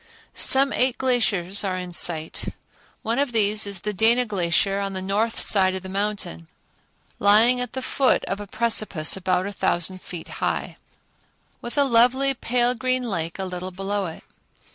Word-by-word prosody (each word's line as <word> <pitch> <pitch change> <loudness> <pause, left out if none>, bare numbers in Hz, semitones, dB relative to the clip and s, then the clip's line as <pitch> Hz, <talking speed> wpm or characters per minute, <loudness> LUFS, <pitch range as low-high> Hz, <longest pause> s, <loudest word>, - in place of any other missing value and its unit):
Some 275 +1 +5
eight 255 0 +1
glaciers 210 -8 0
are 190 -2 -2
in 180 -1 -6
sight. 160 -2 0 0.6
One 230 +4 -1
of 280 -3 0
these 210 -1 +1
is 200 -3 -4
the 210 0 -3
Dana 230 +5 +3
Glacier 195 -1 0
on 195 -1 -3
the 190 - -3
north 215 +4 -1
side 190 -2 +3
of 190 - -6
the 190 - -8
mountain, 195 - -4 0.7
lying 225 +5 +5
at 250 -2 -4
the 260 - -5
foot 265 0 +1
of 195 - -4
a 205 - -8
precipice 215 -7 +1
about 185 -1 -1
a 200 - -4
thousand 185 0 -1
feet 175 -2 -8
high, - - -2 0.9
with 240 +4 -7
a 285 - +5
lovely 260 +2 +3
pale 245 -1 0
green 255 +1 -1
lake 170 -8 -3
a 190 - -3
little 180 0 -5
below 195 +1 -3
it. 165 - -9
205 Hz, 170 wpm, -23 LUFS, 185-240 Hz, 0.9 s, Some